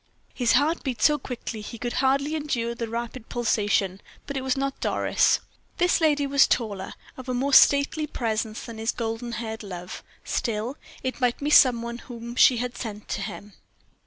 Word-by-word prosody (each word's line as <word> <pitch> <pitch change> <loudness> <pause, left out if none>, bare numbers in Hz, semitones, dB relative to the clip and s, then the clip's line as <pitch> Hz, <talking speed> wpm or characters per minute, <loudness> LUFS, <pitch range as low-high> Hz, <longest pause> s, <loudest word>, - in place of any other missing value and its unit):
His 245 -3 +2
heart 305 +5 +2
beat 255 -5 -3
so 295 +4 +4
quickly 240 -4 -6
he 235 +3 -8
could 240 +2 -4
hardly 275 +3 +2
endure 250 -6 -2
the 235 -1 -5
rapid 235 +1 -5
pulsation; 205 -5 0 0.2
but 280 - -6
it 265 - -1
was 260 0 0
not 275 0 -2
Doris. - - +2 0.4
This 355 -1 +2
lady 295 -3 +3
was 280 0 +4
taller, 200 -5 -2 0.2
of 260 0 -8
a 250 - 0
more 275 +3 0
stately 285 +3 +5
presence 220 -4 -2
than 230 -1 -8
his 225 +1 0
golden 230 +1 -4
haired 220 -2 -5
love; 180 -3 -7 0.2
still, 230 +3 -2 0.3
it 260 +1 -3
might 245 -1 +2
be 290 +1 -2
some 245 -6 +6
one 235 0 -5
whom 235 -1 -8
she 255 -1 +6
had 245 +1 -3
sent 215 -3 -7
to - - -2
him. 205 0 -7
240 Hz, 185 wpm, -25 LUFS, 225-275 Hz, 0.4 s, some